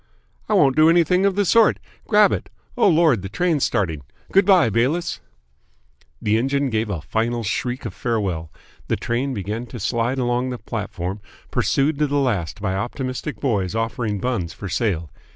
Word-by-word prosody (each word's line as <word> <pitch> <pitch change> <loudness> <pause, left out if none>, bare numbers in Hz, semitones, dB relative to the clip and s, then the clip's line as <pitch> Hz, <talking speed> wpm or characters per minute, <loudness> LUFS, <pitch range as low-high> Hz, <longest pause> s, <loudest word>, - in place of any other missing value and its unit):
"I 215 - +3
won't 140 -8 +4
do 155 +1 +6
anything 175 +3 +4
of 195 - 0
the 205 0 +2
sort. 225 +5 +4 0.3
Grab 210 -2 +5
it! - - -3 0.3
Oh, 245 - +4
Lord, 160 - +4
the 95 - -6
train's 160 - 0
starting! 85 -10 0 0.3
Good 195 0 +4
bye, 180 - +5
Bayliss!" 135 - 0 1.0
The 110 +1 +1
engine 135 +2 0
gave 110 0 -1
a 90 -6 -3
final 115 +6 -1
shriek 120 +4 -2
of - - -4
farewell. 95 - -2 0.4
The - - +1
train 125 +4 -2
began 105 +4 -4
to 120 - -8
slide 120 +5 -1
along 125 0 0
the 125 - -4
platform, 100 -4 -5 0.3
pursued 140 +2 +1
to 150 - +2
the 145 +1 0
last 105 - -1
by 100 -2 -1
optimistic 130 +3 -4
boys 100 -8 -1
offering 115 -2 -2
buns 95 -8 -2
for 100 - -7
sale. 85 -4 -1
120 Hz, 170 wpm, -22 LUFS, 105-145 Hz, 1.0 s, do